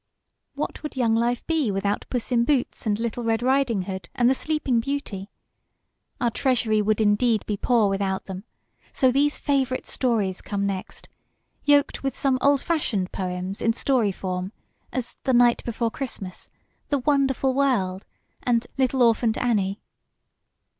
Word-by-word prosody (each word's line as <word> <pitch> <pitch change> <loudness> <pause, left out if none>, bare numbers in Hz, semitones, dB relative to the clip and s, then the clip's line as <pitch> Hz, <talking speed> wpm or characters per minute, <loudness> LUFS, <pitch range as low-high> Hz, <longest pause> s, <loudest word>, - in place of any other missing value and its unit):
What - - -4
would 300 - -6
young 235 -4 +2
life 235 +1 0
be 315 -7 +1
without 200 +1 -1
"Puss 245 0 -2
in 235 -1 +3
Boots" 255 -3 0
and 210 0 +1
"Little 235 +1 -3
Red 225 0 0
Riding 255 -6 +2
Hood" 190 -2 -6
and 245 -2 +3
"The 260 - +5
Sleeping 285 -4 0
Beauty"? 230 -7 -4 0.9
Our 240 - +1
TREASURY 225 -3 +1
would 215 +1 +1
indeed 215 +1 +2
be 210 - -1
poor 225 +1 +2
without 195 -1 -1
them, 190 0 -7 0.5
so 260 -1 +3
these 290 +3 +2
FAVORITE 265 -2 0
STORIES 215 -7 0
come 200 -1 -2
next, 195 -2 -5 0.6
yoked 290 -1 +3
with 270 -1 -3
some 265 -2 +1
OLD 280 -1 +4
FASHIONED 225 - -1
POEMS 185 +1 -4
in 230 - +2
story 240 -4 +2
form, 185 0 -4 0.4
as 250 -2 -3
"The 260 - +2
Night 240 -1 +4
before 230 -1 -1
Christmas," 210 -8 -6 0.4
"The 285 - +2
Wonderful 270 -1 +1
World," 215 -9 0 0.3
and 240 -1 +1
"Little 260 -1 +3
Orphant 230 -1 +3
Annie." 205 -5 0
235 Hz, 155 wpm, -24 LUFS, 200-265 Hz, 0.9 s, The